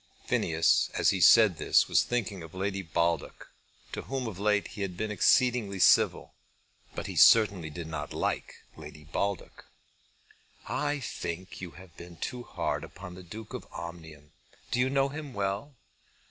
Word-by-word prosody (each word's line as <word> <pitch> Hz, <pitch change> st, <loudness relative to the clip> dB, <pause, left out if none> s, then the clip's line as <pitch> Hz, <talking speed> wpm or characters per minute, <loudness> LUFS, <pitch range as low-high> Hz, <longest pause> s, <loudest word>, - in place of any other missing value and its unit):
Phineas 80 Hz, 0 st, +2 dB
as -, -, +3 dB
he -, -, -2 dB
said -, -, +7 dB
this -, -, +3 dB
was -, -, +4 dB
thinking 105 Hz, -6 st, -2 dB
of 80 Hz, +2 st, -11 dB
Lady 95 Hz, +1 st, -2 dB
Baldock, 85 Hz, -2 st, -2 dB, 0.4 s
to -, -, -4 dB
whom 135 Hz, -1 st, -4 dB
of 105 Hz, -5 st, -6 dB
late 105 Hz, 0 st, +1 dB
he 105 Hz, -, -8 dB
had 95 Hz, -3 st, -4 dB
been 110 Hz, +1 st, -2 dB
exceedingly 120 Hz, -2 st, +2 dB
civil, 90 Hz, -, +4 dB, 0.6 s
but -, -, -4 dB
he -, -, -6 dB
certainly 100 Hz, -7 st, +5 dB
did 80 Hz, +2 st, -7 dB
not 80 Hz, -2 st, -5 dB
like -, -, -3 dB
Lady 75 Hz, -, -11 dB
Baldock. 95 Hz, +5 st, -4 dB, 1.0 s
"I 145 Hz, 0 st, -1 dB
think 90 Hz, -5 st, -6 dB
you 90 Hz, -3 st, -7 dB
have 90 Hz, -3 st, -15 dB
been 85 Hz, -1 st, -11 dB
too 125 Hz, +9 st, -4 dB
hard -, -, -3 dB
upon 90 Hz, -1 st, -10 dB
the 90 Hz, -, -10 dB
Duke 105 Hz, +5 st, -10 dB
of -, -, -7 dB
Omnium. 80 Hz, -3 st, -9 dB, 0.4 s
Do 125 Hz, -, 0 dB
you 130 Hz, +1 st, +3 dB
know 135 Hz, 0 st, +2 dB
him 145 Hz, -3 st, -8 dB
well?" 100 Hz, +8 st, -3 dB
95 Hz, 160 wpm, -29 LUFS, 85-115 Hz, 1.0 s, said